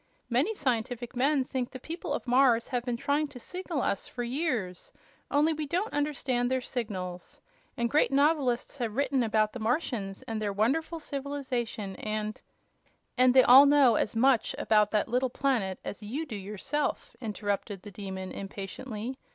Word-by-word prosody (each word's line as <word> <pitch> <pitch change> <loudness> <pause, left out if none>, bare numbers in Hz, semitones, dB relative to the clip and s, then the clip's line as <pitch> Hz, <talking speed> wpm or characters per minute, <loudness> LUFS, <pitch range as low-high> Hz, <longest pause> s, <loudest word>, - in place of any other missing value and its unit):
Many 290 - +2
scientific 245 - -2
men 275 +2 +2
think 255 -1 -3
the 260 - -9
people 330 +7 -6
of - - -2
Mars 245 -2 +4
have 245 -2 -1
been 245 -1 -2
trying 285 +4 0
to 270 -3 -11
signal 355 -1 -3
us 200 - -1
for 245 - -5
years, 240 - -2 0.4
only 300 +3 +3
we 305 -1 -4
don't 370 +9 -1
understand 270 -4 0
their 260 0 +1
signals. 190 -8 -5 0.4
And 235 - +1
great 295 +6 +3
novelists 280 -2 +2
have 225 -3 -2
written 275 -1 +1
about 215 -2 +1
the 245 - -6
Martians 220 -5 -2
and 225 -1 -4
their 205 -1 -1
wonderful 275 +11 0
civilization, 265 -8 -3
and 215 0 -3 0.4
" - - -41
"And 255 0 +5
they 260 - +8
all 270 +3 +9
know 280 -4 +6
as 215 - 0
much 250 0 +3
about 210 -1 +3
that 210 -1 +1
little 250 +2 +1
planet 235 -8 0
as 205 - -5
you 255 +10 -4
do 250 -8 -6
yourself," 210 +9 -3
interrupted 205 -3 -3
the 205 - -9
Demon, 190 -1 -6
impatiently. 210 +5 -6
245 Hz, 170 wpm, -29 LUFS, 215-280 Hz, 0.4 s, all